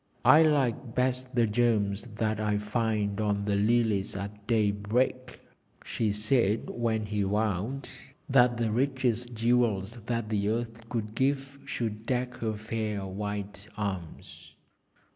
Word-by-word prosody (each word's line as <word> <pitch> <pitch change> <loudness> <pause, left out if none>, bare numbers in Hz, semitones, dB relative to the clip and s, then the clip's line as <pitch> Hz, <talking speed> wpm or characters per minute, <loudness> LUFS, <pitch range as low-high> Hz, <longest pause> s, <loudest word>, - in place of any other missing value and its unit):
'I 155 - +8
like 130 -5 0
best 130 0 0
the 120 -1 +4
gems 105 -2 +1
that 110 0 0
I 105 -1 +1
find 105 -1 -1
on 100 -1 0
the 100 - +1
lilies 105 -2 +2
at 100 +1 -7
daybreak,' 115 +3 0 0.5
she 110 -2 0
said, 110 0 +1
when 110 -2 -1
he 105 0 -1
vowed 105 +6 -1 0.4
that 125 -2 +4
the 115 -2 0
richest 125 -1 0
jewels 115 -2 +1
that 115 -2 -1
the 105 -1 0
earth 115 0 -3
could 110 -3 -3
give 135 +2 -1
should 110 -1 -4
deck 125 -1 -1
her 110 -3 -2
fair 110 -2 -3
white 100 +1 -5
arms. 95 -6 -6
110 Hz, 130 wpm, -29 LUFS, 105-120 Hz, 0.5 s, I